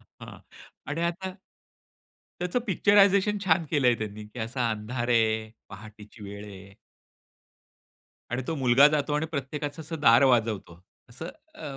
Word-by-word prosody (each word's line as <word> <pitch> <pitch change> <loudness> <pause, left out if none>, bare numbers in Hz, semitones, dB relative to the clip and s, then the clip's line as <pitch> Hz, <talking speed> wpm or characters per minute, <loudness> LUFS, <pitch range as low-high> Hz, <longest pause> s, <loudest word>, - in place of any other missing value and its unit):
हां - - -14 0.5
आणि 160 - -2
आता 190 +2 -7 1.1
त्याचं 180 +6 0
पिक्चरायझेशन 200 +1 +4
छान 170 -2 +2
केलंय 130 -6 +3
त्यांनी 105 0 -6
की 110 - -13
असा 120 +2 -2
अंधार 120 +3 -4
आहे, 110 -2 +1 0.2
पहाटेची 105 +2 -13
वेळ 100 +1 -8
आहे. 100 -1 -12 1.6
आणि 125 +2 -2
तो 165 - -2
मुलगा 130 +1 +5
जातो 150 -1 -1
आणि 150 +2 0
प्रत्येकाचं 145 0 -5
असं 160 0 -7
दार 120 -2 +6
वाजवतो 110 -9 0 0.3
असं 130 +8 -8 0.3
अ, 145 -4 -8
130 Hz, 135 wpm, -27 LUFS, 110-160 Hz, 1.6 s, दार